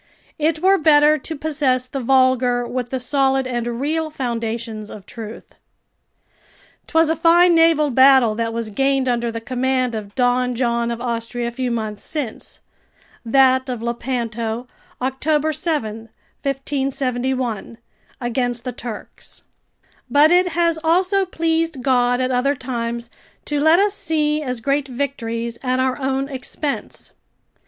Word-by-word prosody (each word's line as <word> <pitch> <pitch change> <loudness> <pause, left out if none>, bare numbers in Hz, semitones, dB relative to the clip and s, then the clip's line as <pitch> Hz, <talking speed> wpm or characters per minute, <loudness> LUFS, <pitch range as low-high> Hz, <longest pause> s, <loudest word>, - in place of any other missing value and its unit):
It 315 +1 0
were 390 +1 +5
better 300 -1 +5
to 320 +4 -6
possess 280 -4 0
the 265 +2 -5
vulgar 255 -1 +2
with 245 0 -4
the 260 - -2
solid 270 +1 +1
and 240 -1 -3
real 315 +3 -1
foundations 230 -5 -4
of 200 -2 -10
truth. 225 -1 -9 1.3
'Twas 320 -1 +3
a - - +1
fine 340 +2 +5
naval 325 -3 +4
battle 260 -3 +6
that 230 +1 -2
was 230 -1 -4
gained 270 +3 +1
under 240 -1 0
the 230 - -4
command 255 +1 -1
of 205 -2 -6
Don 250 0 +1
John 235 -1 0
of 235 -1 -3
Austria 235 0 -3
a - - -9
few 255 +1 -2
months 215 -3 -3
since 285 -8 -5 0.6
[That 260 +2 +3
of 240 -3 -4
Lepanto, 235 -1 -3 0.3
October 295 +4 0
7, 225 -9 -3 0.3
1571.] 265 -4 -2 0.4
against 245 -1 -2
the 250 - -3
Turks; 230 -4 -9 0.7
but 295 +3 +5
it 360 +1 +5
has 335 -1 +1
also 370 +4 +2
pleased 325 -5 -1
God 245 -2 +2
at 255 0 0
other 265 +3 +1
times 235 -2 -4 0.3
to 295 -1 -1
let 315 +3 +5
us 400 +1 +2
see 305 -5 0
as 250 -5 -4
great 280 +2 0
victories 235 -3 -3
at 255 -1 0
our 260 +1 0
own 270 0 -1
expense. 275 +2 -5
260 Hz, 140 wpm, -20 LUFS, 235-295 Hz, 1.3 s, battle